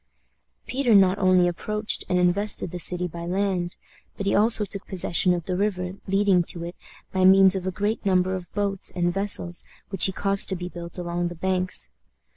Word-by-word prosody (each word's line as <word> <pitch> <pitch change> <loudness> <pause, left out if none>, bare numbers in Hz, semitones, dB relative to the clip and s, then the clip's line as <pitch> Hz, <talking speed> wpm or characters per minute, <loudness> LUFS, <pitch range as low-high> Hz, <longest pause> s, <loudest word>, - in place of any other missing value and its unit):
Peter 255 -4 +1
not 195 0 +4
only 185 -2 +3
approached 210 +5 -2
and 180 - +1
invested 180 +1 +1
the 180 - -6
city 180 +1 +1
by 170 0 -9
land, 185 -1 -2 0.4
but 200 - -5
he 200 - 0
also 215 +1 +4
took 200 -1 -8
possession 180 -1 +1
of 175 -2 -2
the 185 - -3
river 185 -2 -2 0.2
leading 195 -1 +2
to 170 0 -6
it 175 +1 -7 0.4
by 190 0 0
means 190 0 +6
of 190 -1 -3
a - - -1
great 210 +4 -3
number 185 -1 +1
of 180 -2 -7
boats 200 -2 -2
and 175 -1 0
vessels 190 -3 0 0.3
which 195 - +4
he 190 - +2
caused 195 +2 +4
to 190 - +3
be 180 0 -6
built 170 0 -9
along 175 0 -3
the 175 - -7
banks. 185 - -1
185 Hz, 195 wpm, -24 LUFS, 175-200 Hz, 0.4 s, means